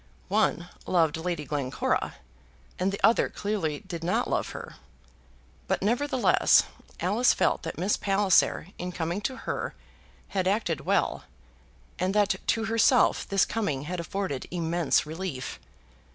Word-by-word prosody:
One -, -, +1 dB, 0.2 s
loved 165 Hz, -4 st, +3 dB
Lady 160 Hz, -2 st, -3 dB
Glencora, 140 Hz, -4 st, -1 dB, 0.6 s
and 185 Hz, +2 st, +1 dB
the 200 Hz, -, -4 dB
other 225 Hz, +2 st, +4 dB
clearly 190 Hz, -8 st, -2 dB
did 170 Hz, -2 st, -7 dB
not 175 Hz, +2 st, +1 dB
love -, -, -1 dB
her. -, -, -8 dB, 0.9 s
But, -, -, 0 dB
nevertheless, 255 Hz, +5 st, +4 dB, 0.4 s
Alice 210 Hz, +8 st, +3 dB
felt -, -, +1 dB
that 165 Hz, -, -6 dB
Miss 185 Hz, +5 st, +1 dB
Palliser, 195 Hz, -3 st, +2 dB
in 180 Hz, +1 st, -4 dB
coming 170 Hz, +3 st, -2 dB
to 260 Hz, +5 st, -2 dB
her, -, -, -3 dB, 0.5 s
had 190 Hz, -2 st, -1 dB
acted 190 Hz, -7 st, 0 dB
well, -, -, +1 dB, 0.7 s
and 185 Hz, +2 st, 0 dB
that 205 Hz, -1 st, +4 dB
to 225 Hz, 0 st, +1 dB
herself 230 Hz, +3 st, +3 dB
this 195 Hz, -1 st, +3 dB
coming 155 Hz, -12 st, -2 dB
had 175 Hz, +4 st, -4 dB
afforded 170 Hz, -4 st, -3 dB
immense 170 Hz, -3 st, +1 dB
relief. 155 Hz, -, -5 dB
185 Hz, 135 wpm, -27 LUFS, 160-205 Hz, 0.9 s, other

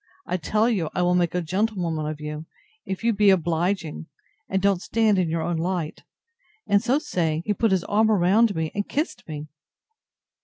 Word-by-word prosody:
I 180 Hz, -, -1 dB
tell 210 Hz, +7 st, +1 dB
you 190 Hz, -10 st, 0 dB
I 180 Hz, -, +1 dB
will 175 Hz, 0 st, +3 dB
make 175 Hz, -1 st, +1 dB
a 180 Hz, -, 0 dB
gentlewoman 175 Hz, -4 st, -1 dB
of 155 Hz, -1 st, -5 dB
you, 150 Hz, +1 st, -6 dB, 0.4 s
if 190 Hz, +3 st, -4 dB
you 230 Hz, 0 st, +3 dB
be 205 Hz, 0 st, +4 dB
obliging, 170 Hz, -, 0 dB, 0.4 s
and 190 Hz, -, +1 dB
don't 195 Hz, -2 st, +2 dB
stand 220 Hz, -3 st, +2 dB
in 175 Hz, -3 st, +1 dB
your 165 Hz, 0 st, -1 dB
own 175 Hz, -1 st, -1 dB
light; 170 Hz, -1 st, -2 dB, 0.6 s
and 200 Hz, 0 st, +3 dB
so 250 Hz, +3 st, +2 dB
saying, 170 Hz, -, -1 dB
he 210 Hz, -, +1 dB
put 225 Hz, +2 st, +1 dB
his 190 Hz, -3 st, +1 dB
arm 220 Hz, +2 st, +2 dB
about 205 Hz, +2 st, +3 dB
me, 160 Hz, -1 st, -2 dB
and 205 Hz, 0 st, -3 dB
kissed 305 Hz, +5 st, -3 dB
me! 150 Hz, -1 st, -6 dB
180 Hz, 190 wpm, -24 LUFS, 160-210 Hz, 0.6 s, be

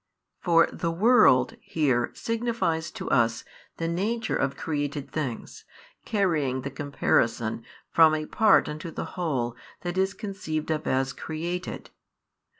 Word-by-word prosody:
For 165 Hz, -2 st, +4 dB
the 170 Hz, -, -2 dB
world 180 Hz, -, +4 dB
here 130 Hz, -7 st, +1 dB
signifies 230 Hz, -9 st, -1 dB
to -, -, -6 dB
us 115 Hz, -4 st, +2 dB, 0.3 s
the 165 Hz, -, -2 dB
nature 220 Hz, +7 st, -1 dB
of 140 Hz, 0 st, -1 dB
created 145 Hz, -2 st, -3 dB
things, 135 Hz, -7 st, -5 dB, 0.4 s
carrying 160 Hz, -, 0 dB
the 140 Hz, -, -5 dB
comparison 120 Hz, -5 st, 0 dB, 0.3 s
from 160 Hz, -1 st, +6 dB
a 155 Hz, 0 st, -3 dB
part 220 Hz, +6 st, +4 dB
unto 155 Hz, +2 st, -5 dB
the -, -, -5 dB
whole 135 Hz, -10 st, -1 dB, 0.3 s
that 175 Hz, +1 st, -2 dB
is 190 Hz, +1 st, +1 dB
conceived 160 Hz, -7 st, -4 dB
of 155 Hz, -1 st, -2 dB
as 135 Hz, +1 st, +1 dB
created. 170 Hz, +5 st, -5 dB
155 Hz, 130 wpm, -26 LUFS, 135-180 Hz, 0.4 s, from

